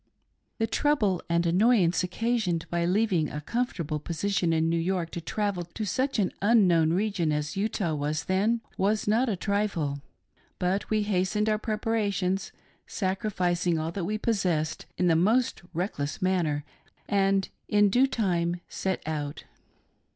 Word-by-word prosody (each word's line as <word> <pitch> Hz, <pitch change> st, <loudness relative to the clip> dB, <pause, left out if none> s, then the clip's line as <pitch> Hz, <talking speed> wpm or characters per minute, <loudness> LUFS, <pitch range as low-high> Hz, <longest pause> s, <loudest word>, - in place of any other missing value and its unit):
The 225 Hz, -, +1 dB
trouble 225 Hz, -, +1 dB
and 170 Hz, +1 st, +2 dB
annoyance 180 Hz, -1 st, +3 dB
occasioned 185 Hz, -3 st, -1 dB
by 170 Hz, 0 st, +1 dB
leaving 185 Hz, -4 st, +2 dB
a 150 Hz, -, -5 dB
com 240 Hz, +11 st, -1 dB
fortable 155 Hz, -6 st, -4 dB
position 175 Hz, 0 st, 0 dB
in 160 Hz, 0 st, +2 dB
New 165 Hz, 0 st, +1 dB
York 175 Hz, -1 st, -1 dB
to 170 Hz, -, -5 dB
travel 200 Hz, +1 st, -2 dB
to 175 Hz, +6 st, -6 dB
such 260 Hz, +7 st, 0 dB
an 195 Hz, -4 st, +1 dB
unknown 185 Hz, -7 st, +4 dB
region 190 Hz, -4 st, 0 dB
as 150 Hz, 0 st, -2 dB
Utah 195 Hz, -4 st, -1 dB
was 150 Hz, +1 st, -2 dB
then, 210 Hz, +5 st, +1 dB, 0.2 s
was 210 Hz, +3 st, +1 dB
not 230 Hz, +4 st, +3 dB
a 210 Hz, -, 0 dB
trifle; 180 Hz, -8 st, -1 dB, 0.6 s
but 185 Hz, +3 st, -1 dB
we 215 Hz, -1 st, +2 dB
hastened 205 Hz, +1 st, 0 dB
our 215 Hz, -1 st, +2 dB
preparations, 205 Hz, -4 st, -1 dB, 0.4 s
sacrificing 185 Hz, -4 st, 0 dB
all 160 Hz, +1 st, -2 dB
that 175 Hz, 0 st, -3 dB
we 210 Hz, +4 st, -1 dB
possessed, 180 Hz, -9 st, -1 dB
in 180 Hz, -, +1 dB
the 170 Hz, -2 st, +4 dB
most 225 Hz, +10 st, +2 dB
reckless 165 Hz, -5 st, -3 dB
manner, 170 Hz, -6 st, 0 dB, 0.4 s
and 195 Hz, -1 st, +2 dB, 0.2 s
in 205 Hz, -1 st, +4 dB
due 255 Hz, +5 st, +4 dB
time 175 Hz, -7 st, 0 dB
set 190 Hz, -1 st, -3 dB
out. 150 Hz, -2 st, -4 dB
190 Hz, 150 wpm, -27 LUFS, 170-210 Hz, 0.6 s, unknown